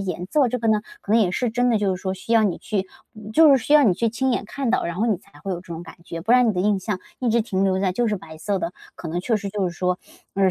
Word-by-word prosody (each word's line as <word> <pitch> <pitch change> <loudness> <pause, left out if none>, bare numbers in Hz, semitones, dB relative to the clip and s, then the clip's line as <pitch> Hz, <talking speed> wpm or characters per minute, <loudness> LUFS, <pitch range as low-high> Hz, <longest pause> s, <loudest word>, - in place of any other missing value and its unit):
颜 180 0 -5
色 285 -5 +3
这 250 - -2
个 225 - -1
呢， 215 -1 +3 0.2
可 210 - -2
能 230 - +5
也 190 -5 +2
是 240 +5 -1
真 245 +2 +1
的 225 - +3
就 200 -2 +1
是 180 - -8
说 190 -1 -1
需 190 +4 -5
要 225 -1 +5
你 195 -5 0
去 195 -3 -2 0.5
就 315 +4 +7
是 275 - +7
需 290 - 0
要 300 - +8
你 190 - +4
去 230 +5 +1
亲 255 +4 0
眼 235 - -1
看 265 +5 -4
到， - - +1
然 170 0 -3
后 220 - +1
你 220 -4 +2
才 155 -5 -20
会 195 - -3
有 175 - -3
这 - - -20
种 165 - -6
感 175 - -12
觉， 165 -1 -6
不 215 +8 +1
然 250 -2 +5
你 - - +2
的 180 - -1
印 205 0 +2
象 205 -1 -3 0.2
一 250 - 0
直 230 +1 +3
停 195 -4 -1
留 190 -1 +2
在 190 -1 +1
就 240 +6 0
是 210 - 0
白 160 -3 -11
色 195 +4 -2
的， 175 - -3 0.2
可 - - -8
能 175 +2 -2
确 220 +4 +1
实 200 -1 -4
就 195 -2 -1
是 - - -5
说， 180 0 0 0.4
嗯， 195 -1 +3
205 Hz, 355 characters per minute, -23 LUFS, 185-230 Hz, 0.5 s, 要